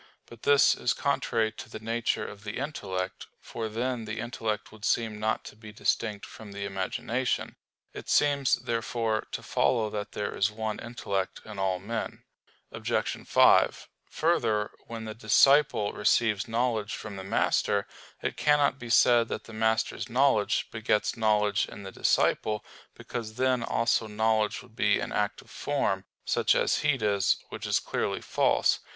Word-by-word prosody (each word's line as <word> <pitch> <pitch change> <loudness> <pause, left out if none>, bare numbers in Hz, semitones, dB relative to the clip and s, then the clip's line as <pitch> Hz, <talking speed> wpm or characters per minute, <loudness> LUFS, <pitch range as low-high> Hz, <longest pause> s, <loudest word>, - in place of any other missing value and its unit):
But 115 -2 -14
this 145 -1 +5
is 120 - 0
contrary 115 -5 0
to 110 - -10
the - - -7
nature 115 0 -1
of 100 0 -9
the 105 - -5
intellect; 95 -10 -4
for 110 -1 -5
then 120 +1 -2
the 110 +1 -5
intellect 110 -3 -3
would 110 -1 -15
seem 110 -2 0
not 110 +1 0
to - - -10
be 110 0 -11
distinct 105 -1 -1
from 105 -2 -11
the 100 0 -4
imagination. 100 +6 -2 0.4
It - - -9
seems, 140 -3 +3
therefore, 115 -1 -2
to - - -5
follow 110 -4 +1
that 105 -1 -5
there 105 -1 -3
is 100 - +2
one 110 0 -4
intellect 100 -5 -3
in 105 -2 -8
all 95 -1 +1
men. 110 +5 -5 0.5
Obj. - - -2
5: - - +4 0.2
Further, 115 -11 +1 0.2
when 115 -1 -6
the 110 - -5
disciple 115 +1 +4
receives 105 -5 +2
knowledge 115 -2 0
from 105 -2 -7
the 95 - -7
master, 100 +1 +1 0.4
it - - -1
cannot 145 -2 +3
be 120 - -8
said 120 0 +5
that 110 - -4
the 115 - -12
master's 110 +3 0
knowledge 125 -4 +2
begets 110 -1 0
knowledge 105 -2 +2
in 100 - -10
the 95 - -7
disciple, 105 +2 +1 0.3
because 110 -3 -6
then 130 -1 +1
also 115 -1 +1
knowledge 110 0 0
would - - -19
be - - +3
an - - -4
active - - -2
form, - - -1 0.2
such - - +2
as - - +2
heat 140 -6 +1
is, 100 -2 +2
which - - -6
is - - +2
clearly - - -2
false. - - +2
110 Hz, 160 wpm, -28 LUFS, 105-120 Hz, 0.5 s, this